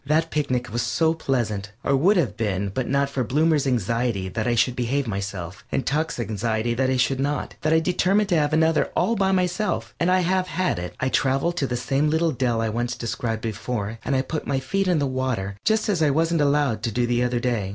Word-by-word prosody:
That 155 Hz, +4 st, +1 dB
picnic 125 Hz, -6 st, -1 dB
was 120 Hz, -, 0 dB
so 160 Hz, +5 st, +1 dB
pleasant 110 Hz, -10 st, -2 dB
or 140 Hz, -, +2 dB
would 185 Hz, +9 st, +4 dB
have 155 Hz, -10 st, +1 dB
been 100 Hz, -3 st, -1 dB
but 130 Hz, +6 st, 0 dB
for 135 Hz, -2 st, -2 dB
Bloomer's 150 Hz, +3 st, +2 dB
anxiety 115 Hz, -4 st, 0 dB
that 110 Hz, +3 st, -2 dB
I 120 Hz, -, +2 dB
should 120 Hz, +2 st, +2 dB
behave 130 Hz, +3 st, 0 dB
myself, 100 Hz, -3 st, -5 dB
and 130 Hz, -, -1 dB
Tuck's 155 Hz, 0 st, -1 dB
anxiety 110 Hz, +1 st, -1 dB
that 130 Hz, +2 st, +1 dB
I 130 Hz, -, +1 dB
should 130 Hz, +1 st, +1 dB
not 145 Hz, +2 st, -2 dB
that 155 Hz, -, +1 dB
I 160 Hz, -, +5 dB
determined 185 Hz, +4 st, +2 dB
to 175 Hz, -, +3 dB
have 150 Hz, -2 st, +2 dB
another 160 Hz, 0 st, +3 dB
all 230 Hz, -, +2 dB
by 195 Hz, -2 st, +2 dB
myself 180 Hz, -, -1 dB
and 170 Hz, -, +2 dB
I 185 Hz, 0 st, +4 dB
have 185 Hz, +1 st, +1 dB
had 180 Hz, -, -1 dB
it. 90 Hz, 0 st, -6 dB
I 130 Hz, -, 0 dB
traveled 135 Hz, +7 st, +1 dB
to 140 Hz, -, 0 dB
the 125 Hz, -, -2 dB
same 135 Hz, +4 st, +1 dB
little 160 Hz, +1 st, +2 dB
dell 120 Hz, -4 st, 0 dB
I 115 Hz, +2 st, -1 dB
described 115 Hz, -1 st, -3 dB
before, 110 Hz, 0 st, -3 dB
and 140 Hz, -, 0 dB
I 130 Hz, -, +1 dB
put 155 Hz, +2 st, -4 dB
my 135 Hz, -1 st, 0 dB
feet 195 Hz, +9 st, -1 dB
in 180 Hz, -2 st, +3 dB
the 145 Hz, -, +1 dB
water 130 Hz, -7 st, -2 dB
just 220 Hz, 0 st, +2 dB
as 195 Hz, -6 st, +1 dB
I 155 Hz, -, +4 dB
wasn't 165 Hz, +2 st, +1 dB
allowed 140 Hz, -6 st, +2 dB
to 115 Hz, 0 st, -2 dB
do 120 Hz, +3 st, +1 dB
the 120 Hz, 0 st, +1 dB
other 125 Hz, 0 st, 0 dB
day. 120 Hz, -6 st, -1 dB
130 Hz, 225 wpm, -24 LUFS, 115-160 Hz, -, I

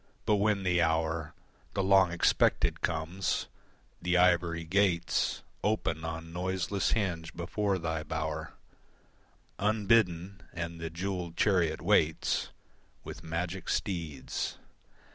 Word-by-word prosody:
But 105 Hz, -, +3 dB
when 100 Hz, -1 st, +2 dB
the 90 Hz, -1 st, +2 dB
hour, 80 Hz, -1 st, 0 dB, 0.4 s
The 95 Hz, -, +1 dB
long 95 Hz, -2 st, +5 dB
expected 85 Hz, -, +2 dB
comes, 85 Hz, +3 st, -1 dB, 0.6 s
the 90 Hz, 0 st, +2 dB
ivory 85 Hz, -2 st, +3 dB
gates 85 Hz, -1 st, +1 dB, 0.2 s
Open 80 Hz, -7 st, 0 dB
on 80 Hz, 0 st, -5 dB
noiseless 95 Hz, +2 st, 0 dB
hinge 85 Hz, -7 st, -1 dB
before 100 Hz, +3 st, -1 dB
thy 80 Hz, -2 st, -2 dB
bower 80 Hz, 0 st, -4 dB, 1.1 s
Unbidden, 100 Hz, -4 st, +2 dB
and 85 Hz, -1 st, -5 dB
the 80 Hz, -, -3 dB
jewelled 90 Hz, 0 st, -4 dB
chariot 90 Hz, -6 st, +2 dB
waits 80 Hz, +1 st, +2 dB, 0.5 s
With -, -, -8 dB
magic 85 Hz, +3 st, -3 dB
steeds. 80 Hz, -8 st, -2 dB
85 Hz, 105 wpm, -30 LUFS, 80-95 Hz, 1.1 s, long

